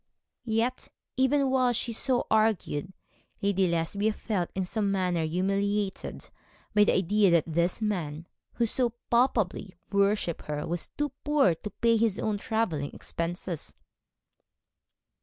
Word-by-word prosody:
Yet, 225 +3 0 0.3
even 265 +1 +2
while 255 -2 +3
she 235 0 -1
so 250 +2 +1
argued, 215 -7 +1 0.5
Lady 195 -2 +2
Lesbia 170 +6 0
felt 200 -6 -2
in 190 -1 -1
some 200 +1 -1
manner 180 -4 0
humiliated 195 +4 -1 0.5
by 210 0 +6
the - - +3
idea 200 +2 +3
that 170 -2 +4
this 170 +6 0
man 165 -7 -2 0.3
who 235 - +1
so 235 +1 +1 0.2
palpably 225 -6 +1 0.2
worshipped 200 -4 +1
her 150 -1 -3
was 170 0 -2
too 295 0 0
poor 290 - +4
to 165 +6 -7
pay 230 +2 +2
his 220 -3 +1
own 210 -2 -1
travelling 200 - -1
expenses. 170 -1 -5
200 Hz, 130 wpm, -28 LUFS, 175-225 Hz, 0.5 s, by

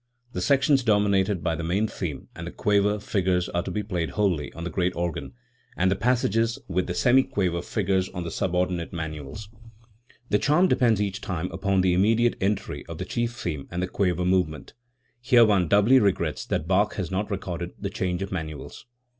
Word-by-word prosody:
The 90 - -3
sections 135 - +3
dominated 105 -4 +2
by 80 - 0
the 85 - -4
main 95 +6 +1
theme 85 -8 -5
and - - -7
the - - -5
quaver 105 0 +2
figures 95 -3 0
are 85 - -1
to - - -6
be 105 - -2
played 90 -5 -2
wholly 90 -8 +1
on 85 - -7
the 85 - -4
great 90 +3 0
organ, 85 -2 -3 0.4
and 95 +1 +2
the - - +2
passages 115 +1 +1
with 90 0 -1
the 90 - -3
semiquaver 100 -8 +2
figures 95 -3 0
on 90 -2 -5
the 85 - -5
sub 90 -2 -1
ordinate 90 -2 -1
manuals. 80 +4 -6 0.8
The 105 - +4
charm 175 +6 +3
depends 115 - +3
each 100 -1 -4
time 90 -1 -3
upon 100 -2 +1
the 90 -1 +3
immediate 115 +6 +3
entry 100 +1 -1
of - - -7
the - - -4
chief 120 0 -2
theme 75 - -4
and 85 - -4
the - - -1
quaver 90 -2 0
movement. 90 -4 0 0.5
Here 120 -2 +6
one 100 -5 +2
doubly 105 +8 +5
regrets 100 -4 0
that 80 - -2
Bach 100 +3 +2
has 95 -4 -3
not 100 +3 -2
recorded 90 -3 -4
the 100 -1 -4
change 90 -1 -2
of 100 - -7
manuals. 80 +3 -6
95 Hz, 195 wpm, -25 LUFS, 90-105 Hz, 0.8 s, Here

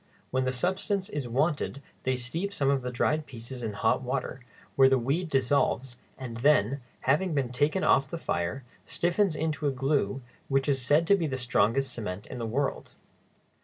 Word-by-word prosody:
When 130 0 +1
the 130 - +1
substance 190 - -1
is 145 - -4
wanted 140 +2 0 0.3
they 130 0 +2
steep 165 +11 -3
some 140 -1 +2
of 135 -1 +1
the 125 - -3
dried 150 +5 0
pieces 120 +1 -8
in 110 -3 -3
hot 110 +4 +1
water, 130 0 -3 0.4
where 135 -1 +7
the 135 - +4
weed 145 +8 -1
dissolves, 135 -2 +1 0.2
and 125 -4 -6
then, 135 0 +3 0.2
having 155 +5 +1
been 130 -4 0
taken 150 +9 +1
off 135 0 +4
the 170 - -4
fire, 90 - -2 0.2
stiffens 175 0 +1
into 155 -1 -1
a - - +2
glue 135 -3 0 0.3
which 135 0 +1
is 135 -2 +2
said 145 +6 +3
to 200 - +5
be 170 -5 -1
the 130 -2 -2
strongest 120 +2 +1
cement 105 -3 -5
in - - -7
the 115 - -3
world. 135 +5 -2
135 Hz, 185 wpm, -28 LUFS, 125-150 Hz, 0.4 s, where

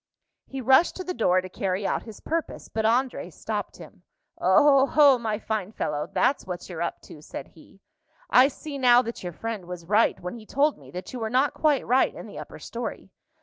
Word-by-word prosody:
He 270 -1 -6
rushed 265 +7 +4
to 370 - -5
the 365 - -4
door 185 - +2
to 185 - -8
carry 190 +1 -2
out - - 0
his 220 -3 -12
purpose; 330 -1 -4
but 220 0 -2
André 250 +3 0
stopped - - -5
him. - - -13 0.4
"Oho, 280 -1 +5
my 220 -2 -2
fine 215 -3 -3
fellow, 150 -6 -3
that's 260 -3 +1
what 180 -1 -6
you're 170 -3 -6
up 170 - -3
to," 150 - -12
said 140 - -8
he. 180 +4 -20 0.5
"I 255 +2 +6
see 285 0 -7
now 245 -1 +6
that 230 0 -6
your 180 - -5
friend 225 -1 -5
was 175 -2 -7
right 210 +5 +3
when 180 - -6
he 225 -3 -11
told 290 +2 +1
me - - -15
that 180 +5 -8
you 250 - -5
were 220 -1 -2
not 260 +4 +2
quite 295 -4 +1
right 255 +2 +2
in - - -8
the - - -9
upper - - -9
story. 230 -4 -6
230 Hz, 210 wpm, -26 LUFS, 185-270 Hz, 0.5 s, I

